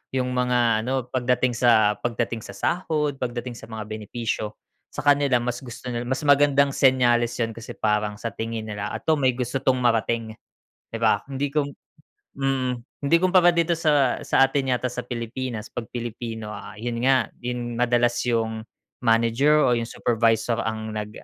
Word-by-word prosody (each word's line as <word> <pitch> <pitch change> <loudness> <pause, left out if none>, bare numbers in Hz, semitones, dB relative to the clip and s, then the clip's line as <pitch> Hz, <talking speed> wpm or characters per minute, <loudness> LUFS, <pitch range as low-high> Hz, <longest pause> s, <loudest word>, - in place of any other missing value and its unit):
yung 125 -1 0
mga 125 -3 +2
ano 130 -1 0
pagdating 125 0 +1
sa 110 -3 +3
pagdating 115 -1 -2
sa - - -10
sahod, 150 -5 -1
pagdating 120 0 -4
sa - - -11
mga 110 -1 -5
benepisyo. 110 0 -4 0.3
Sa - - -6
kanila 140 -3 +4
mas 120 0 -3
gusto 125 -1 -10
nila, 120 0 -2
mas 130 +4 -2
magandang 140 -1 +4
senyales 120 -3 +3
yun 115 -1 -1
kasi 115 +1 -9
parang 105 -1 0
sa 115 0 -4
tingin 115 -1 -4
nila, 105 -1 -4
"Eto, 160 - +1
may 130 -2 +2
gusto 125 +1 -2
'tong 130 -1 +2
marating", 115 -2 0 0.6
di 115 - -4
ba? 110 -3 +3
Hindi 135 +2 -1
kom 145 -2 +1 0.7
mm. 135 -2 0 0.3
Hindi 140 +4 +3
kumpara 180 0 +5
dito 170 0 +2
sa, 145 -6 +2
sa - - +3
atin 135 -1 -1
yata 125 - -4
sa 125 - -4
Pilipinas, 120 -1 -5
pag 115 -2 -5
Pilipino, 115 -2 -5
ah 105 - -9
yun 115 +1 -3
nga 130 +1 +3
yun 120 -1 -4
madalas 120 0 +2
yung 110 -1 -1 0.4
manager 120 +6 +3
o 125 - +3
yung 115 -1 -1
supervisor 115 0 +1
ang 110 0 -3
nag 105 -1 -4
120 Hz, 165 wpm, -24 LUFS, 115-130 Hz, 0.7 s, kumpara